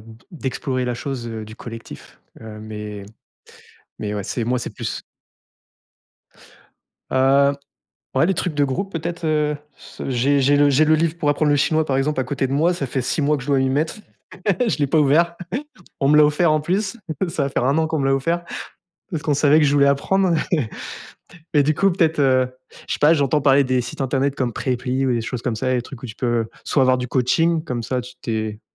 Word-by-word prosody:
de 110 +1 -14
d'explorer 130 -5 -3
la 125 -1 -1
chose, 125 0 -5
heu, 110 -1 -5
du 110 +1 -11
collectif, 115 -1 -10 0.2
heu, 110 -1 -9
mais 105 -2 -7 1.0
mais, 105 -1 -3
ouais, 100 - -3
c'est 115 +3 -3
moi, 125 +2 0
c'est 120 - -5
plus - - -5 2.1
Heu, 135 +2 +4 0.6
ouais, 135 - +4
les 195 - +2
trucs 175 -1 -2
de 145 - +3
groupe, 140 +9 -2
peut-être, 170 0 -4
heu, 150 -1 +1 0.5
j'ai 135 +2 +2
j'ai 140 +2 +4
le 145 0 +5
j'ai 145 +3 +4
le 155 +1 +5
livre 165 +1 0
pour 150 -3 0
apprendre 145 0 +2
le 145 - +3
chinois, 155 +2 +2
par 135 -3 0
exemple, 135 +1 0
à - - +1
côté 135 0 -2
de 135 - -3
moi, 165 +5 +3
ça 150 -6 -3
fait 130 +1 -2
6 135 +5 -1
mois 150 +1 +2
que 135 - -7
je - - -12
dois 140 -2 +3
m'y 130 0 +1
mettre. 150 +4 0 0.7
Je 220 - 0
l'ai 145 - +2
pas 150 +4 +2
ouvert. 160 +4 +3 0.6
On 135 - +2
me 150 - +5
l'a 150 - +8
offert 150 +2 +3
en 155 - +2
plus. 195 +7 -1 0.3
Ça 165 -3 -1
va - - -1
faire 130 - -1
1 140 +4 +2
an 160 - +2
qu'on 160 0 -1
me 135 - 0
l'a 135 - +3
offert. 165 +6 -1 0.7
Parce 160 -5 -3
qu'on 150 - +2
savait 145 +1 +4
que 155 - +4
je 140 - +2
voulais 140 -1 +5
apprendre 180 +6 +2 1.2
et 145 - +6
du 155 +2 +1
coup 195 0 +3
peut-être, 165 -3 +1
heu 130 -2 +3 0.4
je - - 0
sais - - -5
pas, 150 +3 +6
j'entends 145 0 +2
parler 140 0 +5
des 130 -1 +1
sites 125 +3 -8
internet 135 +1 0
comme 125 -3 -1
Preply 130 +2 -1
ou 130 - +2
des 120 - 0
choses 115 +1 -5
comme 125 - -1
ça, 130 +4 -1
des 125 - +1
trucs 125 0 -11
où - - -5
tu 110 - -9
peux, 120 -2 0 0.2
soit 140 - +2
avoir 130 0 +4
du 125 - -3
coaching. 160 +7 +2
Comme 125 -6 -3
ça, 125 +2 -1
tu 125 +1 -11
t'es 110 -2 -3
140 Hz, 225 wpm, -21 LUFS, 125-155 Hz, 2.1 s, l'a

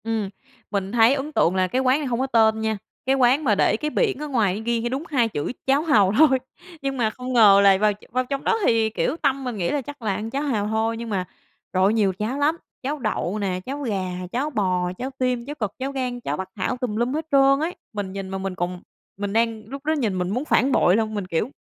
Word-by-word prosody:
Ừm, 220 -3 -2 0.4
mình 195 -2 -2
thấy 230 +2 +5
ấn 280 +2 -3
tượng 180 -7 +2
là 185 0 +2
cái 255 +8 0
quán 260 +2 +3
này 295 - -3
hông 240 -1 -1
có 265 - 0
tên 220 -3 +3
nha, 220 -1 -1 0.3
cái 265 +1 +3
quán 265 +3 +3
mà 220 -7 +3
để 205 - +2
cái 300 - -2
biển 410 +5 +1
ở 300 - -4
ngoài 215 -7 +1
ghi 235 +1 -1
đúng 265 +4 -3
hai 250 -6 +2
chữ 145 -8 -3 0.2
"Cháo 275 +2 +4
hàu" 215 - +4
thôi. 275 -3 +5 0.4
Nhưng 275 -1 -2
mà 225 -3 +2
không 250 +3 -6
ngờ 205 -4 +7
là 195 -1 +6
vào 210 +1 +3 0.2
vào 255 +1 0
trong 275 +2 -3
đó 455 - +2
thì, 225 -1 +3
kiểu, 240 +6 -1
tâm 275 -3 0
mình 245 -4 -4
nghĩ 175 -3 -1
là 290 - 0
chắc 290 +1 -10
là 215 -3 0
ăn 215 +3 -4
cháo 275 +4 -2
hàu 220 -8 0
thôi, 220 +1 0
nhưng 230 0 -6
mà, 190 -3 -1 0.5
trời 185 0 +2
ơi, 200 +3 +4
nhiều 205 -4 +2
cháo 225 +6 -2
lắm, 305 +3 +2 0.3
cháo 290 +3 -2
đậu 215 -4 -2
nè, 190 -3 -1
cháo 280 +3 -5
gà, 200 -8 -2 0.2
cháo 270 +5 -1
bò, 185 -8 0
cháo 255 +2 -4
tim, 250 -2 0
cháo 290 +2 -6
cật, 215 -7 -2
cháo 270 +1 -2
gan, 255 -3 -3
cháo 145 -8 -3
bắc 190 +2 -5
thảo, 220 +6 -2
tùm 245 -4 -3
lum 240 +4 0
hết 315 +1 -2
trơn 275 0 +5
ấy. 335 +4 -2 0.2
Mình 200 -3 -4
nhìn 195 -1 -5
mà 190 - -3
mình 190 -1 -4
còn 180 0 -3 0.4
mình 200 0 -3
đang 225 -1 +1
lúc 275 +4 -8
đó 310 - +2
nhìn 225 -11 -1
mình 180 0 -1
muốn 250 +8 -2
phản 275 -2 +3
bội 185 -7 +4
luôn, 220 0 0
mình, 200 -3 -3
kiểu: 185 +7 -1
230 Hz, 260 wpm, -23 LUFS, 205-270 Hz, 0.5 s, ngờ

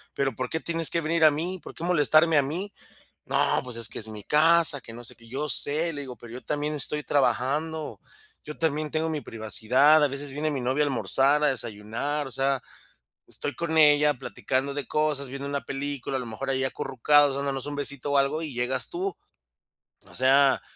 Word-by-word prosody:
¿pero 135 -1 -1
por 130 +1 -4
qué 160 - -3
tienes 165 -1 +2
que 170 - -1
venir 165 +1 0
a 155 - +7
mí? 175 +5 -4
¿Por - - -10
qué 165 - -9
molestarme 160 -1 +3
a - - +5
mí?". 175 +9 -5 0.5
"No, - - +1
pues, 125 -2 -5
es 115 -2 +3
que - - -8
es 110 - -1
mi 105 -1 -9
casa", 160 0 +5
que 115 - -12
no 120 +1 -10
sé - - -4
qué, 115 - -19
"Yo 135 +6 -4
sé", 155 +5 +6
le 145 - -6
digo, 130 -3 -9
"Pero 120 -1 -12
yo 125 - -9
también 150 +1 -3
estoy 150 +1 +1
trabajando, 145 0 -1 0.4
yo 150 - -9
también 155 -2 -2
tengo 160 +1 -1
mi 155 -2 -3
privacidad, 125 +8 +2
a - - +4
veces 140 +1 -6
viene 150 +3 -3
mi 140 -3 -3
novia 130 +4 0
a - - 0
almorzar, 140 +2 +1
a - - +4
desayunar, 120 +5 -4
o - - -11
sea, 135 +2 -1 0.7
estoy 145 - -6
con 160 -1 -1
ella 150 -1 +5
platicando 130 +2 -3
de 145 -1 -5
cosas, 150 -3 -1
viendo 140 +2 -6
una 140 0 -4
película, 140 -1 -5
a - - -4
lo 125 - -7
mejor 115 +5 -5
ahí 130 0 -1
acurrucados, 135 +2 +2
dándonos 140 -1 -2
un 145 0 -5
besito 140 0 -1
o 140 - +3
algo, 140 +4 0
y 155 -3 -6
llegas 125 +2 -1
tú". 375 +2 -4 0.9
O - - -14
sea, 135 +1 +3
140 Hz, 210 wpm, -25 LUFS, 130-150 Hz, 0.9 s, a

